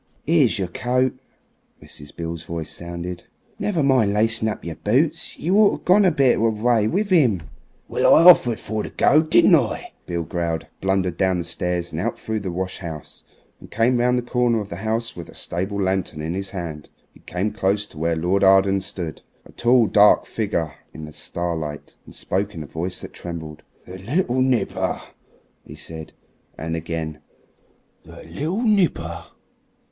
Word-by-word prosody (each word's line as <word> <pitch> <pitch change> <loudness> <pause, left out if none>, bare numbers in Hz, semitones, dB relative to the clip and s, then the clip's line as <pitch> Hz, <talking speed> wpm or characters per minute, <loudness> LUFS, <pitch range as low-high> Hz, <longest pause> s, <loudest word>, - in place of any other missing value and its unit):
"'Ere's 145 -8 +4
your 95 -2 -1
coat," 125 +7 0 0.7
Mrs. 75 0 -11
Beale's 85 -1 -5
voice 80 -2 -5
sounded; 85 +1 -6 0.3
"never 175 -8 0
mind 130 -7 +3
lacing 110 +1 +3
up 105 - -3
of - - -17
your 85 -2 -5
boots. 130 +9 0
You 175 +6 0
orter 210 -2 +3
gone 195 +3 +5
a 180 - +5
bit 135 -5 +3
of - - -2
the 115 - +4
way 115 -3 +3
with 200 - -1
'im." 120 - +3 0.4
"Well, - - +4
I - - +6
offered 120 -10 +7
for 110 -1 -3
to - - -6
go, 150 - +4
didn't 155 - +4
I?" - - +1
Beale 85 -1 -2
growled, 85 0 -3 0.2
blundered 95 -2 0
down 95 -1 +2
the 85 - -2
stairs 90 0 -3
and - - -3
out - - -2
through 110 -1 -3
the 95 -3 -4
wash 95 +2 -4
house, 80 -4 -8 0.4
and - - -14
came 120 +3 +2
round 125 +1 +2
the 125 - -1
corner 120 -1 +1
of 105 -1 -6
the 85 - -6
house 110 +3 -2
with 85 - -9
a - - -14
stable 95 +4 -2
lantern 95 -4 -1
in 80 +2 -3
his 95 +1 -2
hand. 85 -6 -6 0.2
He - - -19
came 95 +4 -3
close 100 -1 0
to 75 - -12
where 85 +1 0
Lord 90 +5 +1
Arden 95 0 +5
stood 85 -5 -5 0.2
a - - -15
tall, 120 0 +3
dark 105 0 +5
figure 90 -9 -2 0.2
in 80 - -7
the 75 - -11
starlight 80 -4 -4
and - - -12
spoke 100 +2 -2
in 80 - -5
a - - -9
voice 85 +5 -4
that - - -9
trembled. 80 -3 -7 0.2
"The 90 +1 -9
little 130 - 0
nipper," 125 -6 0 0.6
he - - -12
said; 80 -1 -9 0.4
and 80 +1 -3
again, 80 -1 -4 0.8
"the - - -13
little 155 - -3
nipper. 155 - +1
95 Hz, 185 wpm, -22 LUFS, 85-120 Hz, 0.8 s, offered